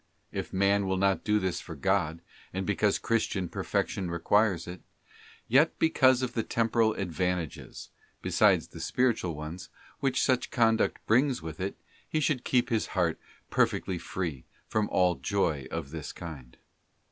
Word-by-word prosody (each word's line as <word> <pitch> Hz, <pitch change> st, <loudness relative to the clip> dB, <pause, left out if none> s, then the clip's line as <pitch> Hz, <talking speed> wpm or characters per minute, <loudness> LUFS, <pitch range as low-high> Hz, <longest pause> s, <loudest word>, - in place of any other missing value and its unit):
'* -, -, -43 dB
If -, -, -4 dB
man 100 Hz, +1 st, +2 dB
will 95 Hz, 0 st, 0 dB
not 95 Hz, 0 st, +2 dB
do 105 Hz, -1 st, +2 dB
this 95 Hz, -4 st, -1 dB
for -, -, -8 dB
God, 85 Hz, -4 st, 0 dB, 0.3 s
and 95 Hz, +1 st, -2 dB
because 105 Hz, 0 st, +2 dB
Christian 105 Hz, -5 st, 0 dB
Perfection 90 Hz, +2 st, -2 dB
requires 90 Hz, +1 st, +2 dB
it, 90 Hz, 0 st, -8 dB, 0.7 s
yet 140 Hz, +7 st, +4 dB
because 130 Hz, -5 st, +4 dB
of 125 Hz, -1 st, -2 dB
the 115 Hz, -, 0 dB
temporal 115 Hz, 0 st, +1 dB
advantages, 90 Hz, -3 st, -3 dB, 0.3 s
beside -, -, +4 dB
the -, -, -12 dB
'spiritual 115 Hz, -10 st, 0 dB
ones, 75 Hz, +4 st, -7 dB, 0.3 s
which 135 Hz, -1 st, +1 dB
such 130 Hz, -1 st, +1 dB
conduct 115 Hz, -2 st, +2 dB
brings 125 Hz, -, +2 dB
with 80 Hz, -1 st, -7 dB
it, 95 Hz, +1 st, -3 dB, 0.3 s
he 155 Hz, -, 0 dB
should 145 Hz, -4 st, 0 dB
keep 125 Hz, -1 st, +2 dB
his 115 Hz, -3 st, 0 dB
heart 85 Hz, -3 st, +1 dB, 0.3 s
perfectly 90 Hz, -2 st, +1 dB
free 85 Hz, -9 st, -4 dB, 0.2 s
from 110 Hz, -1 st, 0 dB
all 90 Hz, -1 st, +3 dB
joy 80 Hz, -9 st, 0 dB
of 70 Hz, -, -5 dB
this 80 Hz, -2 st, -6 dB
kind. 70 Hz, -8 st, -9 dB
100 Hz, 155 wpm, -29 LUFS, 85-115 Hz, 0.7 s, yet